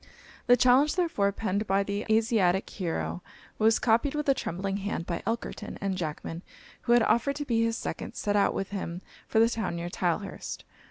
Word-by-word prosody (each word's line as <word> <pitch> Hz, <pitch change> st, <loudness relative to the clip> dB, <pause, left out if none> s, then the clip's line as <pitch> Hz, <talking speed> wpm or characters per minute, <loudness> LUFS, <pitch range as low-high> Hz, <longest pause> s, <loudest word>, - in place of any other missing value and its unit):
The 245 Hz, 0 st, +7 dB
challenge, 255 Hz, +5 st, +4 dB
therefore, 325 Hz, -, +1 dB
penned 205 Hz, 0 st, -2 dB
by 195 Hz, +1 st, +2 dB
the 200 Hz, +1 st, -3 dB
Asiatic 220 Hz, -4 st, +3 dB
hero, 85 Hz, -, -3 dB, 0.4 s
was 220 Hz, +1 st, +4 dB
copied 235 Hz, +5 st, +2 dB
with 300 Hz, -1 st, -2 dB
a -, -, +7 dB
trembling 195 Hz, -3 st, -3 dB
hand 200 Hz, -4 st, -3 dB
by 170 Hz, -1 st, -3 dB
Elkerton; 225 Hz, -2 st, -4 dB
and 195 Hz, -1 st, -1 dB
Jackman, 165 Hz, -1 st, -4 dB, 0.4 s
who 240 Hz, -, +2 dB
had 240 Hz, -1 st, +5 dB
offered 235 Hz, +6 st, +2 dB
to 290 Hz, +1 st, -4 dB
be 230 Hz, -3 st, +2 dB
his 230 Hz, 0 st, 0 dB
second, -, -, -5 dB
set 205 Hz, 0 st, -1 dB
out 200 Hz, -1 st, +3 dB
with 195 Hz, -, -2 dB
him 185 Hz, -3 st, -4 dB, 0.2 s
for -, -, -1 dB
the 225 Hz, +1 st, +6 dB
town 220 Hz, -6 st, -2 dB
near 170 Hz, +1 st, -4 dB
Tylehurst. 180 Hz, +3 st, -3 dB
205 Hz, 185 wpm, -28 LUFS, 185-230 Hz, 0.4 s, The